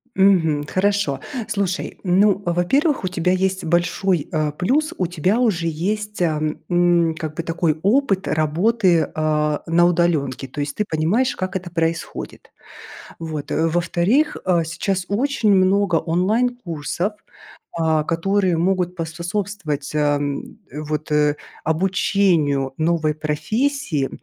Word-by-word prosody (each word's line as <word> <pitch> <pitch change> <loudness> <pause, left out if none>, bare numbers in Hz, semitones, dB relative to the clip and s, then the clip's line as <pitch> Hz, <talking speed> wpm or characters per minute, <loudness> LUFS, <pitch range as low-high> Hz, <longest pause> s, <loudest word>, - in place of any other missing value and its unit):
Мгм. 165 -7 +3
Хорошо. 195 -7 0 0.3
Слушай, 195 -3 -2
ну, 195 +1 +3
во-первых 185 - +1
у - - 0
тебя 180 0 0
есть 190 +1 0
большой, 175 0 +1
э, 155 -1 0
плюс- 275 - 0
у 180 - 0
тебя 180 +6 0
уже 205 -9 +1
есть, 210 +6 -3
а, 160 -3 +1 0.3
м, 175 -2 +3
как 155 -2 -5
бы - - -2
такой 165 -2 0
опыт 200 -3 +2
работы, 170 +3 +2
э, 150 -1 +1
на 170 +1 +3
удалёнке. 165 -7 +1
То 145 +3 -5
есть 145 -1 -4
ты 210 - -1
понимаешь, 175 +12 +1
как 185 0 -4
это 180 -2 -4
происходит. 165 0 -3 0.7
Вот, 155 -3 -5
э. 160 - +1
Во-вторых, 175 - +1
а, 175 -3 +2
сейчас 180 +3 -2
очень 230 0 +1
много 190 -1 +3
онлайн 210 +10 +1
курсов, 175 - -3 0.7
а, 160 -2 +2
которые 185 +2 +1
могут 180 +1 0
поспособствовать, 170 -2 -4
а, 145 -1 +2
м, 145 +8 -4
вот, 150 +1 -4
э, 150 -1 +3 0.3
обучению 160 -5 +1
новой 155 -1 +1
профессии. 160 - -1
175 Hz, 130 wpm, -21 LUFS, 155-195 Hz, 0.7 s, Мгм